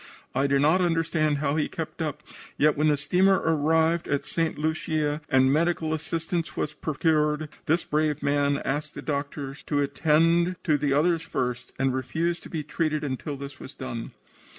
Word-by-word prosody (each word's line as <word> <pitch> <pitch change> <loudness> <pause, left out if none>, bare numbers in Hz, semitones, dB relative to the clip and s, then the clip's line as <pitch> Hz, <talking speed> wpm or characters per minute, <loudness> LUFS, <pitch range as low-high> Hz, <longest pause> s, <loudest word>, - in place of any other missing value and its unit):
I 135 +2 +2
do 140 0 +3
not 155 +7 +4
understand 165 -3 +1
how 140 +1 0
he 150 - 0
kept 165 0 -6
up, 150 -1 -3 0.3
yet 150 +1 +4
when 150 +2 +2
the 150 -1 +3
steamer 185 +7 +3
arrived 160 +1 +2
at 140 - -1
St. 165 -3 -1
Lucia 155 -1 -1
and 130 -1 +4
medical 160 0 +1
assistance 165 +2 -3
was 150 - -1
procured, 150 0 0 0.2
this 165 +3 +2
brave 150 -1 0
man 140 0 +1
asked 145 +3 -2
the - - -7
doctors 140 -1 -4
to 145 - +1
attend 165 +5 +3
to 155 -4 +3
the 145 -1 0
others 165 +4 +3
first 125 -6 -3
and 135 -1 +1
refused 160 +7 -1
to - - -11
be 160 -3 -3
treated 155 0 -1
until 140 +1 -3
this 140 -1 -8
was 135 - -10
done. 120 -3 -5
150 Hz, 175 wpm, -26 LUFS, 140-160 Hz, 0.3 s, not